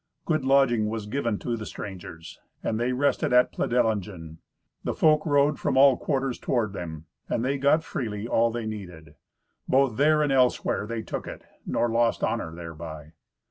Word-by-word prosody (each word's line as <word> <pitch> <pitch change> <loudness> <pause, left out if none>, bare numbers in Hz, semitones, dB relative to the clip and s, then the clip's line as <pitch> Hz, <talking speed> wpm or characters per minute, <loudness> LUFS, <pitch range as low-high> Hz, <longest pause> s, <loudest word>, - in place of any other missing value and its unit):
Good 155 -4 0
lodging 130 -5 +3
was 110 -1 -4
given 115 -1 -1
to 120 +2 -3
the 110 -2 -6
strangers, 85 -4 -9 0.2
and 110 - -1
they 120 +2 0
rested 130 0 +1
at 125 0 +5
Pledelingen. 100 -9 -1 0.4
The - - -2
folk 155 -1 +4
rode 145 0 +3
from - - 0
all 135 -1 +7
quarters 135 -1 -2
toward 110 -6 -1
them, 80 -4 -7 0.2
and 115 - 0
they 135 +1 0
got 145 +4 +3
freely 110 -7 -4
all 115 0 +3
they 115 -1 -4
needed. 90 -8 -8 0.5
Both 130 -4 +2
there 150 +2 +4
and 145 - 0
elsewhere 125 -5 +2
they 115 0 -4
took - - -5
it, - - -8 0.2
nor 120 - +1
lost 115 0 +1
honour 80 - -1
thereby. 80 -2 -9
115 Hz, 170 wpm, -26 LUFS, 100-135 Hz, 0.5 s, all